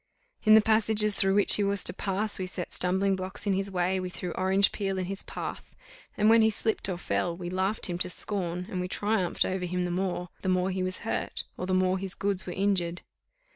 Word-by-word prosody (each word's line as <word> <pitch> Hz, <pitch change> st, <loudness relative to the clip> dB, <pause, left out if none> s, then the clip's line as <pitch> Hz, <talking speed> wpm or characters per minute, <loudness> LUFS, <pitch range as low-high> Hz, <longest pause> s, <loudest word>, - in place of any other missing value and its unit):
In 215 Hz, 0 st, +8 dB
the 220 Hz, -, +8 dB
passages 215 Hz, -1 st, +3 dB
through 195 Hz, 0 st, +2 dB
which 205 Hz, -, +5 dB
he 205 Hz, -, +1 dB
was 200 Hz, -1 st, +1 dB
to -, -, +4 dB
pass, 200 Hz, +2 st, +1 dB
we 185 Hz, -, -2 dB
set 180 Hz, -1 st, -6 dB
stumbling 190 Hz, +2 st, +1 dB
blocks 185 Hz, +2 st, -6 dB
in 200 Hz, -, +2 dB
his 195 Hz, +1 st, -1 dB
way, 185 Hz, 0 st, 0 dB
we 185 Hz, 0 st, -4 dB
threw 180 Hz, -1 st, -5 dB
orange 190 Hz, +2 st, +2 dB
peel 195 Hz, -2 st, -2 dB
in 185 Hz, -, -1 dB
his 195 Hz, +2 st, -5 dB
path, -, -, -7 dB, 0.4 s
and 210 Hz, -, +3 dB
when 225 Hz, +1 st, +6 dB
he 220 Hz, -, +5 dB
slipped 220 Hz, -1 st, -1 dB
or 180 Hz, -, -2 dB
fell, 175 Hz, -1 st, -1 dB
we 175 Hz, -1 st, -6 dB
laughed 190 Hz, +3 st, -1 dB
him 175 Hz, -1 st, -3 dB
to 180 Hz, -, -1 dB
scorn, 180 Hz, -2 st, -3 dB
and 180 Hz, -, -2 dB
we 180 Hz, -, -2 dB
triumphed 205 Hz, -2 st, 0 dB
over 185 Hz, -1 st, -2 dB
him 180 Hz, 0 st, -2 dB
the 175 Hz, -, -2 dB
more, 180 Hz, -1 st, -2 dB
the 190 Hz, -, -2 dB
more 185 Hz, +1 st, +1 dB
he 185 Hz, 0 st, -2 dB
was 185 Hz, 0 st, -1 dB
hurt, -, -, -2 dB
or 180 Hz, -, -5 dB
the 185 Hz, -, +1 dB
more 185 Hz, 0 st, +2 dB
his 190 Hz, 0 st, -3 dB
goods 195 Hz, -2 st, -2 dB
were 180 Hz, -, -4 dB
injured. 185 Hz, -3 st, 0 dB
190 Hz, 235 wpm, -28 LUFS, 180-200 Hz, 0.4 s, In